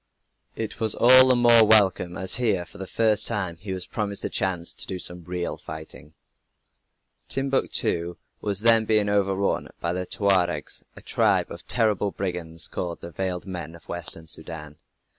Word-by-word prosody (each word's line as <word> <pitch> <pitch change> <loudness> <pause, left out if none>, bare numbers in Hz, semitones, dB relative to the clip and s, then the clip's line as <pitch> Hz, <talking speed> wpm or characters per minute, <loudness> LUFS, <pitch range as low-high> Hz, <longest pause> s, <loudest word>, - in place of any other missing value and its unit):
It 110 -2 -5
was 110 -2 +2
all 130 +1 +7
the 130 - +5
more 120 -2 +6
welcome 100 -5 +3
as 95 - -2
here, 110 -8 0
for - - -16
the 95 - -6
first 110 0 +1
time, 95 -7 -2
he 95 +3 -8
was 95 -1 -4
promised 100 -3 -4
a - - -2
chance 90 -2 -1
to - - -5
do 95 - -4
some 90 -1 -2
real 90 -1 -4
fighting. 80 0 -10 1.1
Timbuctoo 130 -10 0 0.2
was 100 -1 +2
then 115 -1 +5
being 105 -2 +2
overrun 100 -1 0
by 85 0 -2
the 90 0 -4
Tuaregs, 90 -6 0
a - - -13
tribe - - +1
of - - -10
terrible 105 -4 +2
brigands 90 -4 -2
called 85 -2 -5
"the 85 - -9
veiled 90 +1 -4
men" 85 -4 -7
of 85 - -17
Western 85 -1 0
Soudan. 80 -1 -5
95 Hz, 165 wpm, -24 LUFS, 85-110 Hz, 1.1 s, all